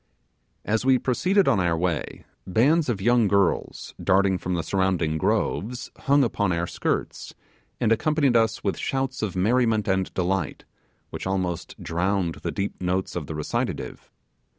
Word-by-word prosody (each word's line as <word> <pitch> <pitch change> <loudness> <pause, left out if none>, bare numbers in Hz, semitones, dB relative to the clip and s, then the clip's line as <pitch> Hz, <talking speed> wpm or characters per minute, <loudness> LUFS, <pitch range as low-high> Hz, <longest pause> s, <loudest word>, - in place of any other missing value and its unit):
As 110 +2 0
we 130 0 +4
proceeded 180 +11 +1
on 100 - +3
our 85 -2 +1
way, 85 -3 -2 0.2
bands 140 - +3
of 100 -5 -2
young 120 -1 +4
girls, 100 -1 0
darting 95 0 +3
from 90 0 -2
the 85 - -1
surrounding 90 -5 0
groves, 115 +11 -1
hung 140 0 +3
upon 105 -5 0
our 85 0 0
skirts, - - -3 0.4
and 110 - +1
accompanied 145 +1 +2
us 115 -1 +2
with 100 - -1
shouts 135 -1 -2
of 105 -4 -2
merriment 110 +2 +2
and 95 -1 0
delight, 90 -3 -1 0.5
which - - -5
almost 95 -3 -2
drowned 85 0 -1
the - - -3
deep 100 -1 -4
notes 90 +1 -1
of 80 -5 -4
the 80 - -5
recitative. 75 - -3
100 Hz, 150 wpm, -25 LUFS, 90-120 Hz, 0.5 s, we